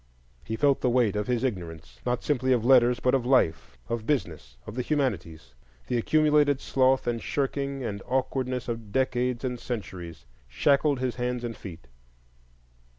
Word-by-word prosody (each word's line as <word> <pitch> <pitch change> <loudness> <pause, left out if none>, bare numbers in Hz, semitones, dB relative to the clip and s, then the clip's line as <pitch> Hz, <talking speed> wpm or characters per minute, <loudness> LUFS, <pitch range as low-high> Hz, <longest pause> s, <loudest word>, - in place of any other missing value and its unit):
He 110 - -4
felt 140 +2 +2
the 125 - +2
weight 120 -4 +2
of 105 0 -2
his 125 -1 0
ignorance,—not 85 - -4
simply 130 -3 +1
of 120 -2 0
letters, 125 -2 +5
but 125 +1 +1
of 135 -3 +2
life, 120 - +1
of 115 -1 -4
business, 80 - -2
of - - -7
the 125 - -2
humanities; 90 - -2 0.3
the 125 - -1
accumulated 150 +1 +3
sloth 130 -1 +2
and 120 -1 -1
shirking 140 -1 -2
and 100 -4 -4
awkwardness 130 -1 -1
of 115 -3 -5
decades 125 0 0
and 125 -2 -3
centuries 90 - -6 0.2
shackled 140 - +2
his 125 -2 -2
hands 125 0 -2
and 115 -2 -4
feet. 85 -5 -10
125 Hz, 155 wpm, -27 LUFS, 105-130 Hz, 0.3 s, letters